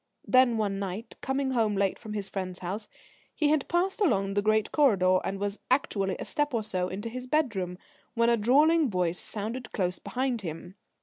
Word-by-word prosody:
Then, 255 -2 +4
one 200 -2 -1
night, 200 +4 -5
coming 265 0 -1
home 225 -4 +1
late 195 -1 0
from 215 -2 -7
his 205 -2 -3
friend's 185 -2 -4
house, 195 +4 -4 0.5
he 300 -3 +2
had 300 -2 +2
passed 375 +4 0
along 195 - +2
the 205 - +2
great 215 0 +2
corridor, 190 -11 +4
and 195 - -2
was 200 +1 -3
actually 195 -8 +1
a - - -6
step 295 -3 -1
or 225 - 0
so 185 -4 -1
into 195 +4 -5
his 250 +2 -6
bedroom, 215 - 0 0.4
when 230 0 +3
a 235 - +5
drawling 290 +7 +4
voice 180 -3 0
sounded 225 +4 -4
close 180 -2 -1
behind 250 -2 -2
him. 175 0 -7
215 Hz, 190 wpm, -28 LUFS, 195-255 Hz, 0.5 s, a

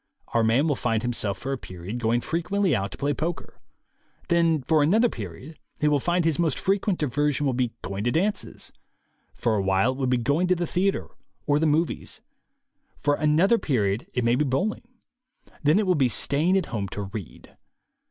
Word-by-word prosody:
Our 115 - +1
man 120 +7 +3
will 145 - +1
find 115 -3 -1
himself 115 -5 -1
for 135 - -5
a 135 - -4
period 95 +5 -7
going 120 +1 +1
frequently 180 +2 0
out 100 -2 -2
to - - -8
play 145 +1 0
poker; 160 +4 -5 0.7
then 165 -4 +3
for 155 +3 +3
another 215 +11 +4
period 115 - -8 0.2
he 150 - +2
will 150 -1 +3
find 175 +4 +1
his 165 -2 +1
most 160 -5 +1
frequent 195 -1 0
diversion 145 0 0
will 135 - +1
be 125 -1 -1
going 100 +2 -4
to 120 - +2
dances; 205 +7 -2 0.6
for 115 - 0
a 100 - +1
while 95 +5 +2
it 130 - -7
will 130 - 0
be 125 0 +2
going 145 +9 +1
to 185 - +3
the 175 0 -1
theatre 190 +4 0 0.4
or 145 0 +2
the 160 - +2
"movies"; 160 +3 -1 0.8
for 145 - +1
another 160 +10 +3
period 105 -6 0
it 125 - +1
may 115 0 +3
be 135 +5 +2
bowling; 150 - -1 0.7
then 150 +3 +4
it 215 - +2
will 185 - +3
be 135 -6 +2
staying 155 +10 +2
at 190 - 0
home 100 -3 -2
to 100 +2 -5
read. 100 -1 -9
145 Hz, 195 wpm, -25 LUFS, 120-170 Hz, 0.8 s, another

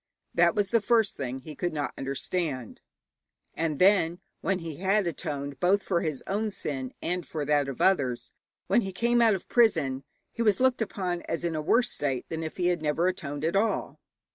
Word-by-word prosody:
That - - +4
was 205 -2 +1
the 230 -1 +3
first 225 -1 +2
thing 130 -1 -4
he 155 +3 -9
could 175 +2 -2
not 145 -2 -2
understand. 135 - -3 0.7
And 160 -3 -1
then, 180 -2 +4 0.2
when 195 - 0
he 165 -4 -7
had 195 +2 +2
atoned 145 -4 -4
both 190 +5 +3
for 175 -3 0
his 155 -5 -3
own 210 +3 -1
sin 135 -9 -4
and 180 +1 -1
for 155 -3 -4
that 145 -1 +2
of 135 - -6
others, 130 -10 +2 0.3
when 205 +6 +3
he 195 -3 -5
came 240 +4 +2
out 225 -3 +5
of 190 - -7
prison, 160 - +2 0.3
he 235 - -5
was 210 -4 +3
looked 255 -2 +3
upon 185 -5 -2
as 165 - -2
in 170 -1 -1
a 155 - -1
worse 230 +9 +3
state 135 -4 -2
than 160 0 -3
if 160 -1 -5
he 180 -1 +2
had 175 -2 0
never 155 +3 +1
atoned 145 -5 -3
at 165 - 0
all. 215 +3 0
170 Hz, 200 wpm, -28 LUFS, 145-195 Hz, 0.7 s, out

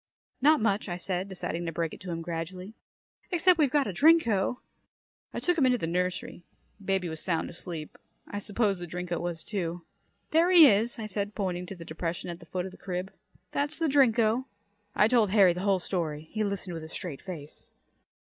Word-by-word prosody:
"Not 305 +3 +6
much," 205 -2 0
I 175 - -3
said, 185 +1 -2
deciding 175 -2 -3
to - - -1
break 165 0 -2
it - - -9
to 185 - -8
him 165 -1 -3
gradually. 175 +4 -5 0.6
"Except 355 0 +4
we've 295 -3 +4
got 285 +1 +2
a 200 - -3
Drinko." 245 - +4 0.7
I - - -4
took 355 -2 +1
him 275 - +5
into 250 -1 +3
the 190 - -3
nursery. 180 +1 -2 0.4
Baby 190 -2 0
was 160 -1 -5
sound 170 -3 -1
asleep. 165 -3 -7 0.3
I 205 - -4
supposed 205 -2 0
the 175 - -5
Drinko 175 0 -3
was, 170 -2 -4
too. 175 -4 -3 0.5
"There 330 +3 +4
he 350 -4 +9
is," 225 +2 +2
I 225 - -4
said, 205 0 -3
pointing 180 -3 -2
to 195 - -7
the 170 -2 -10
depression 165 +2 -4
at 170 - -8
the 170 - -15
foot 180 +1 -3
of 190 - -6
the - - -14
crib. 185 0 -4 0.4
"That's 285 +1 -1
the 330 - 0
Drinko." 245 -3 +3 0.5
I 210 - +5
told 225 -3 +3
Harry 190 -3 +6
the 180 - -5
whole 195 -1 +3
story. 160 -4 -3
He 215 0 -1
listened 200 -3 -3
with 165 -1 -6
a - - -7
straight 160 -3 -7
face. 155 -6 -9
190 Hz, 205 wpm, -28 LUFS, 175-225 Hz, 0.7 s, he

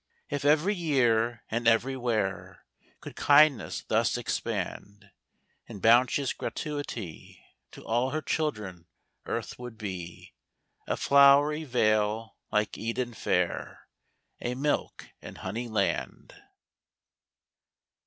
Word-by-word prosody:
If 145 -1 -2
every 155 +7 +3
year 120 - +1
and 115 +1 -1
everywhere 115 -4 0 0.4
Could - - -9
kindness 145 -4 +4
thus - - +1
expand 100 0 -4 0.6
In 100 - -9
bounteous 125 +5 +3
gratuity, 140 - -6 0.3
To - - -12
all 120 +3 +1
her 155 +2 -3
children 105 - -3 0.4
earth - - -4
would 125 -2 -8
be 90 -6 -7 0.5
A - - -1
flowery 140 +2 +5
vale 110 -3 +1 0.2
like 105 -1 0
Eden 120 +2 -3
fair, - - -2 0.5
A 120 +1 -2
milk 145 +3 -2
and - - -10
honey 115 +6 -5
land. 100 -7 -2
120 Hz, 100 wpm, -28 LUFS, 105-140 Hz, 0.6 s, flowery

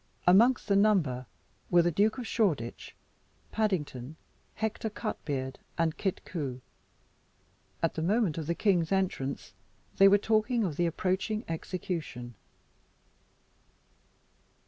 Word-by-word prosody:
Amongst 225 +9 +5
the 200 - +3
number 175 - +2 0.4
were 175 -1 +5
the 175 - +2
Duke 210 +8 +2
of 250 - -4
Shoreditch, 165 - -1 0.6
Paddington, 155 - -2 0.4
Hector 220 0 -2
Cutbeard, 140 - -4 0.2
and 165 -2 +1
Kit 190 -3 -3
Coo. 140 -7 -4 1.2
At 165 - +2
the 160 - -3
moment 190 -2 +1
of 155 - -5
the 170 - 0
king's 180 -5 +2
entrance, 180 -8 -1 0.4
they 195 - +8
were 200 +1 +7
talking 220 +3 +1
of 170 -7 -2
the 175 +2 +1
approaching 190 +6 -1
execution. 160 -7 -4
180 Hz, 115 wpm, -30 LUFS, 155-210 Hz, 1.2 s, they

